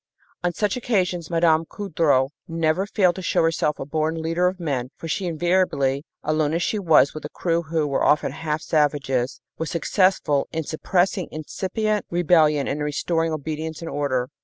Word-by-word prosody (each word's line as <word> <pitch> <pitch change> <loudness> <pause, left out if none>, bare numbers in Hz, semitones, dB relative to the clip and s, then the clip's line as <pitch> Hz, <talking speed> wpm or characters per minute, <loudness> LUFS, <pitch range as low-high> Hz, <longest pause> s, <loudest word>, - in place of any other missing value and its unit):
On 175 - +1
such 205 +2 -1
occasions 185 -9 -1
Mme. 165 -2 +3
Coudreau 150 -9 +1 0.2
never 165 +3 0
failed 190 -4 +3
to - - -4
show 170 - +1
herself 165 -2 +1
a - - -5
born 155 +2 -1
leader 165 +3 +1
of 185 +1 -2
men, 135 -7 -2
for 165 - -7
she 180 +4 -2
invariably 160 -5 +1 0.2
alone 155 0 +1
as 170 - 0
she 215 - 0
was 160 -6 +4
with 155 - -7
a 150 - -5
crew 170 0 -1
who 160 -1 -1
were 140 -2 0
often 150 - +3
half 155 -1 -3
savages 140 -5 0 0.2
was 160 - -2
successful 170 -4 +1
in 160 0 -2
suppressing 180 +4 0
incipient 200 +7 -2
rebellion 160 -4 +3
and 145 - -2
in - - -2
restoring 165 +2 0
obedience 155 +1 -4
and 165 - -6
order. 130 -3 -1
160 Hz, 175 wpm, -23 LUFS, 150-175 Hz, 0.2 s, was